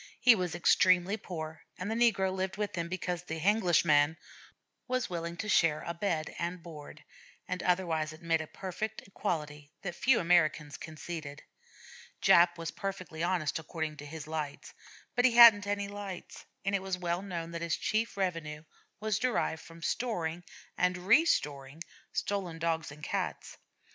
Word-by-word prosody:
He 250 Hz, -1 st, +8 dB
was 180 Hz, -5 st, -2 dB
extremely 185 Hz, +2 st, +4 dB
poor, 160 Hz, -6 st, -7 dB, 0.2 s
and 190 Hz, +4 st, -4 dB
the -, -, +1 dB
negro 220 Hz, -5 st, +3 dB
lived 190 Hz, 0 st, -2 dB
with 210 Hz, -1 st, -2 dB
him 170 Hz, -1 st, -3 dB
because 180 Hz, -1 st, -3 dB
the 165 Hz, -2 st, -5 dB
'Henglish 185 Hz, -1 st, +3 dB
man' 150 Hz, +1 st, +4 dB, 0.7 s
was 255 Hz, -5 st, -1 dB
willing 170 Hz, 0 st, -4 dB
to 215 Hz, -, -4 dB
share 165 Hz, -6 st, +3 dB
bed 170 Hz, -3 st, -2 dB
and 170 Hz, 0 st, -3 dB
board, 150 Hz, -2 st, -10 dB, 0.4 s
and 180 Hz, 0 st, -3 dB
otherwise 170 Hz, -4 st, +1 dB
admit 165 Hz, 0 st, -1 dB
a 160 Hz, -, -7 dB
perfect 200 Hz, +5 st, -5 dB
equality 150 Hz, -7 st, -4 dB
that 175 Hz, -3 st, -3 dB
few 240 Hz, +7 st, +3 dB
Americans 155 Hz, -4 st, +2 dB
conceded. 155 Hz, -2 st, -7 dB, 0.8 s
Jap 170 Hz, 0 st, +5 dB
was 165 Hz, -1 st, -4 dB
perfectly 185 Hz, -5 st, -5 dB
honest 170 Hz, -4 st, 0 dB
according 160 Hz, -1 st, -4 dB
to 145 Hz, -, -9 dB
his 155 Hz, 0 st, -7 dB
lights, 155 Hz, -2 st, -5 dB, 0.4 s
but 245 Hz, -, +3 dB
he 255 Hz, -2 st, +5 dB
hadn't 225 Hz, -4 st, +9 dB
any 205 Hz, 0 st, -1 dB
lights; 200 Hz, -3 st, -8 dB, 0.2 s
and 195 Hz, -, 0 dB
it 200 Hz, -, +1 dB
was 190 Hz, -1 st, -2 dB
well 175 Hz, 0 st, -1 dB
known 170 Hz, -4 st, -5 dB
that 170 Hz, 0 st, -5 dB
his 170 Hz, -1 st, 0 dB
chief 220 Hz, 0 st, -1 dB
revenue 165 Hz, -5 st, -2 dB, 0.4 s
was 215 Hz, -1 st, 0 dB
derived 245 Hz, -10 st, 0 dB
from 165 Hz, 0 st, -13 dB
storing 175 Hz, -6 st, -2 dB, 0.4 s
and 180 Hz, 0 st, +2 dB
restoring 165 Hz, -, +2 dB, 0.3 s
stolen 190 Hz, -5 st, -2 dB
Dogs 165 Hz, -2 st, -1 dB
and 150 Hz, +1 st, -13 dB
Cats. -, -, -3 dB
175 Hz, 160 wpm, -31 LUFS, 160-195 Hz, 0.8 s, hadn't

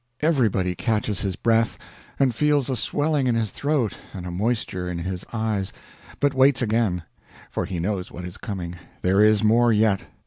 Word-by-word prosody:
Everybody 115 Hz, -, +2 dB
catches 105 Hz, 0 st, -1 dB
his 95 Hz, -2 st, -1 dB
breath, 115 Hz, +1 st, +2 dB, 0.4 s
and 135 Hz, -3 st, +3 dB
feels 145 Hz, +1 st, +2 dB
a -, -, 0 dB
swelling 145 Hz, +3 st, 0 dB
in 120 Hz, -, +2 dB
his 110 Hz, -3 st, 0 dB
throat 140 Hz, -9 st, 0 dB, 0.2 s
and 90 Hz, -2 st, -6 dB
a 90 Hz, -, -4 dB
moisture 95 Hz, -2 st, -1 dB
in 90 Hz, -, -3 dB
his 90 Hz, +1 st, -4 dB
eyes 110 Hz, -4 st, -1 dB, 0.5 s
but 145 Hz, -1 st, +2 dB
waits 130 Hz, -2 st, +4 dB
again; 110 Hz, -6 st, +1 dB, 0.5 s
for -, -, -2 dB
he 95 Hz, -3 st, -4 dB
knows 95 Hz, +1 st, -2 dB
what 90 Hz, -, -7 dB
is 90 Hz, -, -7 dB
coming; 90 Hz, -6 st, -5 dB, 0.3 s
there 95 Hz, +3 st, +3 dB
is 105 Hz, 0 st, +5 dB
more 115 Hz, +2 st, +4 dB
yet. 105 Hz, -2 st, +3 dB
110 Hz, 175 wpm, -24 LUFS, 95-125 Hz, 0.5 s, is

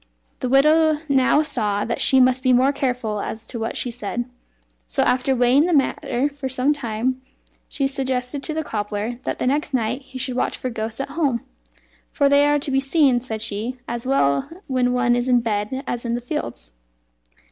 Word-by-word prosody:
The 255 Hz, -, -2 dB
widow 305 Hz, +3 st, +4 dB
now 270 Hz, +2 st, +4 dB
saw 210 Hz, -9 st, -1 dB
that 235 Hz, -, -2 dB
she 265 Hz, -, +5 dB
must 255 Hz, 0 st, +4 dB
be 255 Hz, -1 st, +3 dB
more 260 Hz, +3 st, +4 dB
careful 245 Hz, -6 st, -2 dB
as 220 Hz, +1 st, -5 dB
to 235 Hz, -, -6 dB
what 225 Hz, +1 st, -3 dB
she 245 Hz, -, -1 dB
said; 240 Hz, +1 st, -4 dB, 0.6 s
so, -, -, +1 dB
after 260 Hz, +1 st, +2 dB
weighing 250 Hz, +6 st, +4 dB
the 355 Hz, -, +1 dB
matter 270 Hz, -1 st, +1 dB
for 285 Hz, -2 st, -5 dB
some 260 Hz, +3 st, +1 dB
time, 255 Hz, -1 st, -2 dB, 0.5 s
she 275 Hz, -2 st, 0 dB
suggested 265 Hz, 0 st, -2 dB
to 310 Hz, -, -3 dB
the 315 Hz, -, -1 dB
cobbler 210 Hz, -1 st, -3 dB
that -, -, -2 dB
the -, -, -2 dB
next 285 Hz, +1 st, 0 dB
night 245 Hz, +2 st, -1 dB
he 265 Hz, -1 st, -11 dB
should 255 Hz, -1 st, -2 dB
watch -, -, -1 dB
for 255 Hz, -, -4 dB
ghosts 225 Hz, +2 st, -4 dB
at 275 Hz, -, -5 dB
home; 280 Hz, -6 st, -1 dB, 0.6 s
"for 280 Hz, -, +2 dB
they 285 Hz, +1 st, +5 dB
are 295 Hz, 0 st, +3 dB
to 285 Hz, -1 st, -3 dB
be 270 Hz, -, +3 dB
seen," 270 Hz, -2 st, +3 dB
said 225 Hz, -3 st, -5 dB
she, 225 Hz, +4 st, -2 dB
"as 235 Hz, +1 st, -4 dB
well 140 Hz, -, +2 dB, 0.2 s
when 255 Hz, -2 st, +1 dB
one 250 Hz, -1 st, +2 dB
is 245 Hz, +1 st, -1 dB
in 250 Hz, -1 st, +4 dB
bed 225 Hz, +3 st, -2 dB
as 240 Hz, -1 st, -3 dB
in 235 Hz, -1 st, -1 dB
the -, -, -2 dB
fields." -, -, -5 dB
255 Hz, 200 wpm, -22 LUFS, 235-275 Hz, 0.6 s, she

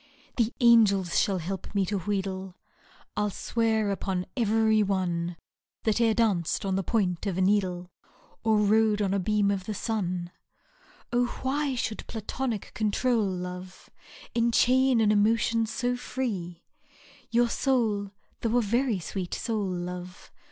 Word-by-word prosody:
The 230 Hz, -1 st, +2 dB
angels 210 Hz, -7 st, +5 dB
shall 195 Hz, -2 st, +1 dB
help 190 Hz, +4 st, -5 dB
me 195 Hz, -1 st, +2 dB
to 200 Hz, +1 st, -1 dB
wheedle 190 Hz, 0 st, -2 dB
j 185 Hz, -, -15 dB, 0.6 s
I -, -, +2 dB
*11 205 Hz, -, -2 dB
swear 220 Hz, -3 st, 0 dB
upon 185 Hz, -1 st, -2 dB
i^yery 220 Hz, -2 st, +3 dB
one 175 Hz, -3 st, -1 dB, 0.5 s
That 220 Hz, +1 st, +1 dB
e'er 225 Hz, -2 st, +3 dB
danc'd 200 Hz, -7 st, +1 dB
on 190 Hz, -1 st, 0 dB
the 195 Hz, -, +1 dB
point 190 Hz, -2 st, 0 dB
of 185 Hz, -3 st, -2 dB
a -, -, +1 dB
needle 185 Hz, -2 st, +1 dB, 0.3 s
*, -, -, -31 dB
Or 220 Hz, -1 st, +3 dB
rode 210 Hz, 0 st, +3 dB
on 195 Hz, -2 st, +1 dB
a 200 Hz, -, +1 dB
beam 205 Hz, +1 st, +2 dB
of 190 Hz, -2 st, -2 dB
the 215 Hz, -, -4 dB
sun 180 Hz, -6 st, -2 dB
I 380 Hz, -8 st, -32 dB
Oh! 245 Hz, -, +4 dB, 0.2 s
why 275 Hz, +1 st, 0 dB
should 225 Hz, -3 st, -3 dB
Platonic 225 Hz, 0 st, -4 dB
control, 220 Hz, +1 st, +1 dB
love, 180 Hz, 0 st, -6 dB, 0.2 s
" -, -, -17 dB
Enchain 245 Hz, +1 st, +3 dB
an 210 Hz, -1 st, +4 dB
emotion 225 Hz, +2 st, +2 dB
so 245 Hz, +3 st, -1 dB
free? 195 Hz, -10 st, -4 dB, 0.7 s
Your 240 Hz, +1 st, +3 dB
soul, 225 Hz, -6 st, 0 dB, 0.3 s
though 230 Hz, +1 st, +1 dB
a -, -, +4 dB
very 235 Hz, +1 st, +1 dB
sweet 180 Hz, +1 st, -4 dB
soul, 215 Hz, -4 st, -2 dB
love. 180 Hz, 0 st, -6 dB
210 Hz, 155 wpm, -27 LUFS, 185-230 Hz, 0.7 s, angels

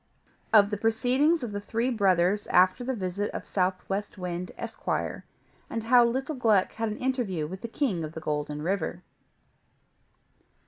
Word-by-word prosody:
OF 205 Hz, -1 st, +6 dB
THE 210 Hz, -, -1 dB
PROCEEDINGS 255 Hz, +9 st, +2 dB
OF 235 Hz, -, -4 dB
THE 205 Hz, 0 st, -4 dB
THREE 230 Hz, +5 st, -1 dB
BROTHERS 195 Hz, -2 st, +2 dB
AFTER 185 Hz, +6 st, +4 dB
THE 260 Hz, +1 st, -2 dB
VISIT 195 Hz, 0 st, -2 dB
OF -, -, -5 dB
SOUTHWEST 195 Hz, +2 st, -2 dB
WIND, 180 Hz, -1 st, -4 dB
ESQUIRE; -, -, -3 dB, 0.5 s
AND 225 Hz, -, -3 dB
HOW 240 Hz, +1 st, +6 dB
LITTLE 265 Hz, +6 st, -1 dB
GLUCK 215 Hz, -6 st, +3 dB
HAD 225 Hz, 0 st, -2 dB
AN 210 Hz, -, -4 dB
INTERVIEW 240 Hz, -, -1 dB
WITH 185 Hz, +5 st, -7 dB
THE -, -, -4 dB
KING 225 Hz, -, -1 dB
OF 155 Hz, 0 st, -6 dB
THE 160 Hz, -, -6 dB
GOLDEN 150 Hz, -1 st, -3 dB
RIVER. 180 Hz, 0 st, -2 dB
205 Hz, 155 wpm, -27 LUFS, 180-235 Hz, 0.5 s, OF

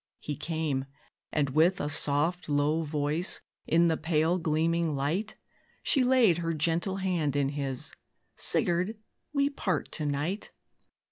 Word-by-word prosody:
He 150 Hz, -, -5 dB
came, 155 Hz, -3 st, -2 dB, 0.5 s
and, 145 Hz, -3 st, +1 dB
with 165 Hz, +6 st, +3 dB
a -, -, -1 dB
soft, 150 Hz, +3 st, +1 dB
low 145 Hz, +2 st, +2 dB
voice, 150 Hz, +2 st, 0 dB, 0.3 s
In 170 Hz, +1 st, +4 dB
the 160 Hz, -1 st, +1 dB
pale 160 Hz, +2 st, +1 dB
gleaming 165 Hz, 0 st, +1 dB
light, 165 Hz, +11 st, -1 dB, 0.5 s
She 270 Hz, -, +3 dB
laid 245 Hz, -9 st, +4 dB
her 165 Hz, -1 st, -1 dB
gentle 170 Hz, +5 st, 0 dB
hand 175 Hz, -7 st, 0 dB
in 140 Hz, -1 st, +2 dB
his 140 Hz, -3 st, -3 dB, 0.4 s
"Sigurd, 180 Hz, +5 st, +1 dB, 0.3 s
we 280 Hz, -1 st, +2 dB
part 190 Hz, -, -2 dB
to 150 Hz, -, -2 dB
night. 150 Hz, +8 st, -2 dB
160 Hz, 135 wpm, -29 LUFS, 145-180 Hz, 0.5 s, In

